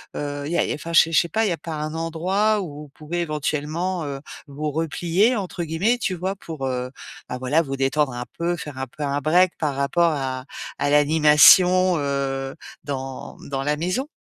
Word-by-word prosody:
heu, 145 Hz, -1 st, -4 dB
il 150 Hz, -, -4 dB
y -, -, +1 dB
a -, -, +3 dB
il -, -, -3 dB
y -, -, 0 dB
a, -, -, -1 dB
enfin, 165 Hz, +2 st, -7 dB
je -, -, +9 dB
sais 165 Hz, -, -2 dB
je 155 Hz, -, +5 dB
sais 170 Hz, -, 0 dB
pas, 225 Hz, +7 st, +1 dB
il 205 Hz, -, +1 dB
y -, -, 0 dB
a 170 Hz, -, -1 dB
pas 165 Hz, -, -7 dB
un 155 Hz, +1 st, -4 dB
endroit 185 Hz, +6 st, 0 dB
où 150 Hz, -4 st, -7 dB
vous 150 Hz, -, -13 dB
pouvez 155 Hz, +5 st, -5 dB
éventuellement, 155 Hz, +3 st, -2 dB
heu, 140 Hz, -1 st, -5 dB, 0.3 s
vous 150 Hz, +2 st, -4 dB
«replier» 170 Hz, -, +1 dB
entre 185 Hz, -4 st, -4 dB
guillemets, 175 Hz, +10 st, +1 dB
tu 210 Hz, -5 st, -2 dB
vois? 185 Hz, +3 st, -3 dB
Pour, 160 Hz, -8 st, -7 dB
heu, 125 Hz, -1 st, -3 dB, 0.4 s
bah 125 Hz, -, -3 dB
voilà, 135 Hz, +6 st, +2 dB
vous 135 Hz, -3 st, -4 dB
détendre 135 Hz, +1 st, +1 dB
un 120 Hz, 0 st, -5 dB
peu, 170 Hz, +1 st, 0 dB
faire 150 Hz, -4 st, -8 dB
un 130 Hz, -, -3 dB
peu 150 Hz, +4 st, -8 dB
un 140 Hz, 0 st, -1 dB
break 175 Hz, +4 st, +3 dB
par 150 Hz, -4 st, -1 dB
rapport 165 Hz, +5 st, +2 dB
à 130 Hz, -3 st, -3 dB, 0.3 s
à -, -, +1 dB
l'animation, 160 Hz, +5 st, +6 dB
heu, 135 Hz, -1 st, -2 dB, 0.3 s
dans, 135 Hz, -2 st, -6 dB
mmh, -, -, -12 dB
dans 135 Hz, -1 st, -2 dB
la 150 Hz, +1 st, 0 dB
maison. 185 Hz, -, -2 dB
155 Hz, 230 wpm, -23 LUFS, 140-175 Hz, 0.4 s, je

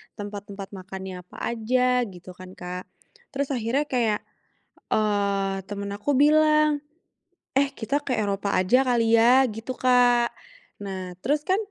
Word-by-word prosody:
tempat-tempat 205 Hz, -1 st, -7 dB
makannya 190 Hz, -1 st, -7 dB
apa -, -, -14 dB
aja", 250 Hz, +1 st, +1 dB
gitu 180 Hz, -1 st, -11 dB
kan, 185 Hz, +1 st, -12 dB
Kak. 180 Hz, 0 st, -7 dB, 0.5 s
Terus 280 Hz, 0 st, -1 dB
akhirnya 250 Hz, +3 st, 0 dB
kayak, 230 Hz, -5 st, +1 dB, 0.7 s
eee, 200 Hz, -2 st, +1 dB
temen 200 Hz, 0 st, -5 dB
aku 280 Hz, +8 st, -1 dB
bilang, 305 Hz, +1 st, +4 dB, 0.8 s
"Eh, 275 Hz, 0 st, +3 dB
kita 235 Hz, +5 st, -2 dB
ke 260 Hz, -, -2 dB
Eropa 200 Hz, -1 st, -1 dB
aja 245 Hz, +9 st, +3 dB
kali 230 Hz, -2 st, +3 dB
ya", 250 Hz, +3 st, +5 dB
gitu, 225 Hz, +4 st, -5 dB
Kak. 245 Hz, -1 st, +4 dB, 0.6 s
Nah, 185 Hz, -2 st, -6 dB
terus 295 Hz, +3 st, +1 dB
kan 375 Hz, -, +4 dB
225 Hz, 135 wpm, -25 LUFS, 195-255 Hz, 0.8 s, ya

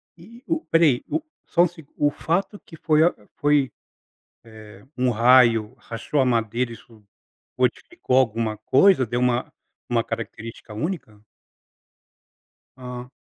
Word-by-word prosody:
E 230 Hz, +9 st, -16 dB
o 330 Hz, 0 st, -1 dB
peraí. 160 Hz, -7 st, +3 dB
O 315 Hz, -, -1 dB, 0.2 s
só 175 Hz, -, +3 dB
um -, -, +3 dB
segu 160 Hz, -4 st, -16 dB
O 145 Hz, -, +3 dB
fato 195 Hz, +7 st, -2 dB
que 165 Hz, -, -15 dB
foi 155 Hz, 0 st, +3 dB
a 175 Hz, -, +3 dB, 0.2 s
foi, 145 Hz, -3 st, +2 dB, 0.7 s
eh, 110 Hz, -1 st, -14 dB
um 125 Hz, 0 st, +2 dB
raio 115 Hz, -1 st, +4 dB
rachou 120 Hz, +4 st, -4 dB
a 130 Hz, -, +4 dB
madeira 120 Hz, 0 st, 0 dB
isso, 110 Hz, -1 st, -15 dB, 0.5 s
modificou 130 Hz, -, 0 dB
alguma 115 Hz, -3 st, +1 dB
coisa, 135 Hz, -, +4 dB
deu 120 Hz, +2 st, -2 dB
uma 125 Hz, 0 st, 0 dB, 0.4 s
uma 120 Hz, -1 st, +1 dB
característica 115 Hz, -1 st, -7 dB
única? 110 Hz, -, -5 dB, 1.5 s
Ah. 125 Hz, -1 st, -8 dB
125 Hz, 130 wpm, -23 LUFS, 115-160 Hz, 1.5 s, raio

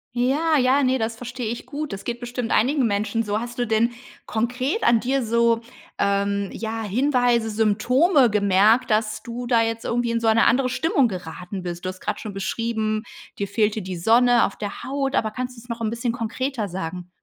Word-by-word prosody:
Ja, 295 Hz, +6 st, +2 dB
ja, 265 Hz, +2 st, +3 dB
ne, 260 Hz, 0 st, +2 dB
das 225 Hz, 0 st, -2 dB
verstehe 245 Hz, 0 st, -6 dB
ich 235 Hz, -, -6 dB
gut. 300 Hz, -1 st, -5 dB
Das 195 Hz, -, -7 dB
geht 240 Hz, 0 st, -4 dB
bestimmt 245 Hz, -1 st, -4 dB
einigen 260 Hz, +2 st, +3 dB
Menschen 210 Hz, +2 st, 0 dB
so. 210 Hz, 0 st, -1 dB
Hast 240 Hz, +1 st, -7 dB
du 240 Hz, -, 0 dB
denn 225 Hz, +2 st, +2 dB, 0.3 s
konkret 250 Hz, -, -1 dB
an 235 Hz, -1 st, +5 dB
dir 260 Hz, +2 st, 0 dB
so, 230 Hz, 0 st, +2 dB, 0.4 s
ähm, 200 Hz, 0 st, +1 dB
ja, 225 Hz, 0 st, -4 dB
Hinweise, 245 Hz, +1 st, +2 dB
Symptome 240 Hz, -, +3 dB
gemerkt, 210 Hz, +4 st, +3 dB
dass 215 Hz, 0 st, 0 dB
du 240 Hz, 0 st, -6 dB
da 235 Hz, -2 st, +4 dB
jetzt 225 Hz, 0 st, -2 dB
irgendwie 240 Hz, 0 st, 0 dB
in 230 Hz, -, 0 dB
so 230 Hz, -, -1 dB
eine 225 Hz, +1 st, +4 dB
andere 255 Hz, +1 st, +3 dB
Stimmung 280 Hz, -1 st, +2 dB
geraten 180 Hz, 0 st, -6 dB
bist? 175 Hz, 0 st, -6 dB
Du -, -, -1 dB
hast 185 Hz, 0 st, -8 dB
gerade -, -, -3 dB
schon 210 Hz, -3 st, -7 dB
beschrieben: 215 Hz, +2 st, -2 dB, 0.3 s
„Dir 200 Hz, -, -2 dB
fehlte 210 Hz, +1 st, 0 dB
die 185 Hz, -1 st, -5 dB
Sonne 235 Hz, +6 st, +4 dB
auf -, -, -5 dB
der 205 Hz, -2 st, -6 dB
Haut“. 275 Hz, 0 st, -2 dB
Aber 220 Hz, -1 st, +1 dB
kannst 250 Hz, +2 st, -5 dB
du -, -, -11 dB
es 245 Hz, -, -18 dB
noch 235 Hz, 0 st, -5 dB
'n 220 Hz, -, 0 dB
bisschen 235 Hz, +1 st, -2 dB
konkreter 235 Hz, 0 st, -3 dB
sagen? 180 Hz, 0 st, -5 dB
230 Hz, 200 wpm, -23 LUFS, 210-250 Hz, 0.4 s, an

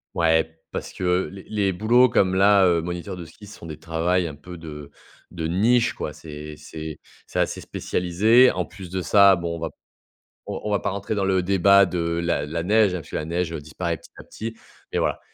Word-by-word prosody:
Ouais, 80 Hz, -1 st, +2 dB
parce -, -, -5 dB
que 90 Hz, 0 st, 0 dB
les 95 Hz, -1 st, -10 dB
les 100 Hz, -3 st, +1 dB
boulots 120 Hz, +6 st, +4 dB
comme 95 Hz, -5 st, +2 dB
là, 100 Hz, 0 st, +5 dB
heu, 85 Hz, -2 st, +3 dB
moniteur 90 Hz, +3 st, -5 dB
de 85 Hz, -, -8 dB
ski, 90 Hz, +6 st, -14 dB
ce 105 Hz, -, -13 dB
sont 85 Hz, -, -10 dB
des 75 Hz, -, -7 dB
travails 85 Hz, +3 st, 0 dB
un 80 Hz, -, -6 dB
peu 90 Hz, +4 st, -11 dB
de 75 Hz, -3 st, -9 dB, 0.4 s
de 80 Hz, -2 st, -5 dB
niche, 115 Hz, +8 st, +2 dB
quoi. -, -, -5 dB
C'est 75 Hz, -1 st, -9 dB
c'est 80 Hz, 0 st, -8 dB, 0.3 s
c'est -, -, -3 dB
assez -, -, 0 dB
spécialisé. 110 Hz, +8 st, +3 dB
En 90 Hz, -1 st, -2 dB
plus 95 Hz, -2 st, -11 dB
de 95 Hz, +1 st, -3 dB
ça, 100 Hz, -1 st, +6 dB
bon, 85 Hz, -1 st, -3 dB
on 85 Hz, -, -7 dB
va 80 Hz, -, -3 dB, 0.8 s
on -, -, -5 dB
on 105 Hz, -, -2 dB
va 100 Hz, -, +1 dB
pas -, -, -1 dB
rentrer 100 Hz, +2 st, -3 dB
dans 100 Hz, -2 st, 0 dB
le 95 Hz, -1 st, +2 dB
débat 100 Hz, +1 st, +5 dB
de 90 Hz, 0 st, -3 dB, 0.2 s
la 85 Hz, -4 st, 0 dB
la 80 Hz, +3 st, -3 dB
neige, 105 Hz, 0 st, +4 dB
hein, 90 Hz, -, -3 dB
puisque -, -, -16 dB
la -, -, -2 dB
neige 85 Hz, +1 st, -2 dB
disparaît 80 Hz, +2 st, -4 dB
petit -, -, -18 dB
à -, -, -10 dB
petit, 115 Hz, +1 st, -7 dB, 0.4 s
mais -, -, 0 dB
voilà. -, -, 0 dB
90 Hz, 220 wpm, -23 LUFS, 80-100 Hz, 0.8 s, ça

